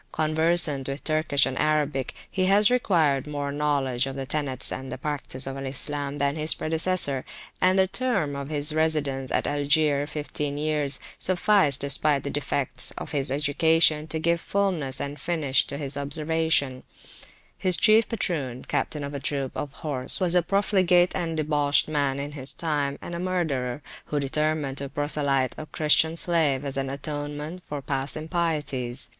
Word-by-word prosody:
Conversant 155 -3 +1
with 135 +1 -5
Turkish 155 -3 +2
and 135 - -3
Arabic, 150 -3 0
he 185 -1 -1
has 205 +3 +5
acquired 160 - +2
more 145 -1 -3
knowledge 140 -3 0
of 135 - -5
the 135 -1 -4
tenets 135 -2 -1
and 130 -1 -5
practice 140 -2 -4
of 135 0 -5
Al 135 0 -5
Islam 140 +1 -2
than 140 0 0
his 155 0 +3
predecessor, 160 -4 0 0.4
and 185 +1 +4
the 190 - +5
term 195 - -1
of 140 0 -5
his 150 0 +1
residence 145 -4 0
at - - +1
Algier, 145 0 +2
fifteen 145 -1 -3
years, 150 -2 0 0.2
sufficed, 185 -6 +3
despite 140 +1 +1
the 140 - -3
defects 135 -3 -1
of - - -6
his 140 -3 0
education, 155 +2 +3
to 160 - -2
give 170 +1 +1
fulness 180 -10 -1
and 145 +1 -5
finish 155 -6 +2
to 140 - -4
his 140 -1 -3
observations. 150 -2 -1 0.7
His 185 -2 +1
chief 215 +1 +4
patroon, 145 - -3
captain 150 -2 -1
of 140 +1 -5
a 140 - -4
troop 135 -1 -2
of 145 - -3
[p.359] - - -17
horse, 135 -4 -1
was 180 -3 +1
a 180 - +5
profligate 185 -1 +3
and 165 -2 -2
debauched 145 -2 +2
man 140 -3 0
in 145 +1 -4
his 140 -2 +1
time, 145 -4 -1
and 175 - -7
a 170 - -4
murderer, 150 -8 -2 0.2
who 150 - -2
determined 145 0 -1
to 140 -1 -5
proselyte 140 -2 0
a 155 - -7
Christian 160 +2 +3
slave 155 -6 +2
as 140 -1 -1
an 135 0 -2
atonement 145 +4 -5
for 145 -2 -6
past 135 +1 -1
impieties. 150 -6 0
145 Hz, 165 wpm, -25 LUFS, 140-160 Hz, 0.7 s, has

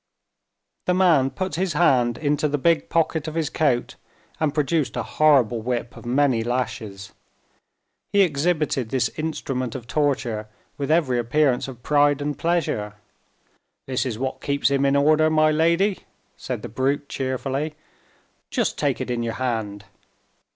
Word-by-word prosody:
The 180 - +3
man 165 -8 +4
put 185 +6 -4
his 185 -2 0
hand 125 -8 +3
into 150 0 0
the 145 0 -1
big 165 +3 +1
pocket 160 -2 0
of 155 - -5
his 160 -3 -1
coat, 135 -6 0 0.4
and 155 -2 +1
produced 150 0 0
a - - -1
horrible 130 -7 +3
whip, 120 0 -3
of - - -11
many 130 -2 +2
lashes. 110 -5 -4 1.0
He 200 - +4
exhibited 150 -6 0
this 130 -1 +1
instrument 135 -6 -4
of 125 -3 -6
torture 120 -6 -1 0.3
with 140 0 -4
every 150 -7 +2
appearance 125 +2 +1
of 125 -2 -10
pride 145 -1 +3
and 145 0 -2
pleasure. 150 -12 -1 0.9
"This 130 -1 -1
is 120 -5 -3
what 130 +2 -3
keeps 140 0 0
him 140 0 +2
in 140 - +2
order, 155 +2 +4
my 155 0 +3
lady," 170 +6 +2 0.4
said - - -5
the - - -4
brute, 135 +5 -1
cheerfully. 135 +3 -3 0.7
"Just - - -1
take - - 0
it - - -3
in 120 -1 -1
your 115 -1 -3
hand." 110 -5 -3
140 Hz, 150 wpm, -23 LUFS, 125-155 Hz, 1.0 s, man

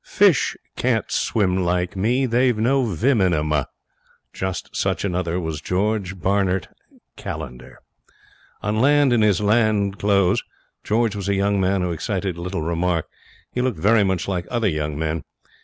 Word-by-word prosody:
Fish - - +3 0.2
can't - - 0
swim 95 -4 +1
like 90 +1 -1
me, 120 +8 +1
they've 125 -1 +2
no 130 +4 +2
vim 115 - +1
in 90 -3 +3
'em.' 75 0 -1 0.8
Just 95 -1 -4
such - - -1
another 90 -2 -1
was 80 -3 -4
George 100 +1 -1
Barnert 95 0 +1 0.5
Callender. 65 -6 -7 0.9
On 105 +1 -1
land, 145 -1 +4
in 115 - +3
his 105 -2 +3
land 105 -2 +2
clothes, 100 -3 +2 0.4
George 110 -1 +1
was 100 -1 -3
a 100 - +2
young 100 0 +1
man 95 0 +1
who 90 - -1
excited 95 +2 -2
little 90 0 -4
remark. 85 0 0 0.5
He 125 - -1
looked 125 -6 -1
very 105 +6 +4
much 95 -2 -1
like 90 -3 -2
other 120 -3 0
young 75 -2 -2
men. 80 -1 -2
95 Hz, 155 wpm, -22 LUFS, 90-110 Hz, 0.9 s, land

